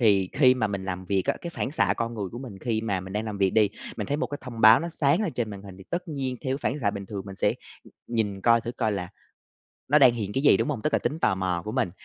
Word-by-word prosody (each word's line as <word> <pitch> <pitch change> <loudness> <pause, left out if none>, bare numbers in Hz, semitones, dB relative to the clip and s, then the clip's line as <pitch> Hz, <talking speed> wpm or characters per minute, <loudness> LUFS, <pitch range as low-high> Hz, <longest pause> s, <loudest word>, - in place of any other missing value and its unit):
thì 100 -5 +4
khi 130 -3 +5
mà 110 -4 0
mình 100 -2 -4
làm 95 -1 -4
việc 95 0 +1
á, - - +2
cái 170 - -5
phản 170 - -3
xạ 100 -9 +2
con 115 0 -2
người 100 -4 -3
của 120 - -6
mình 120 -7 -8
khi 110 0 -1
mà 100 -4 -1
mình 95 +1 -9
đang 105 +1 -2
làm 105 -2 -5
việc 95 -1 +3
đi, 105 -1 +4 0.3
mình - - -3
thấy 145 - -1
một 160 - -1
cái 145 - -6
thông 120 -3 -8
báo 110 +2 +8
nó 170 - -3
sáng 160 +3 +1
lên 175 - -2
trên 115 -3 -2
màn 100 -1 -8
hình, 95 -2 -11
thì 95 - -12
tất 180 0 -3
nhiên 135 -4 -3
theo 130 +1 0
cái - - -1
phản 145 - -6
xạ 100 -3 +2
bình 100 -1 -7
thường 100 -2 -5
mình 95 -1 -8
sẽ, - - +1 0.3
ừm, - - -17
nhìn 105 -4 -1
coi 115 +1 +4
thử 120 - -5
coi 110 -4 -1
là 90 -3 -3 0.8
nó 150 +3 +6
đang 130 -4 +7
hiện 105 -4 -4
cái 135 - -1
gì, - - +6
đúng - - -1
hông? 130 -7 -3
Tức 150 - 0
là - - +3
tính 145 +7 -2
tò 95 - +2
mò 90 -2 -1
của 110 - -4
mình. 125 -8 0
110 Hz, 320 wpm, -26 LUFS, 100-130 Hz, 0.8 s, báo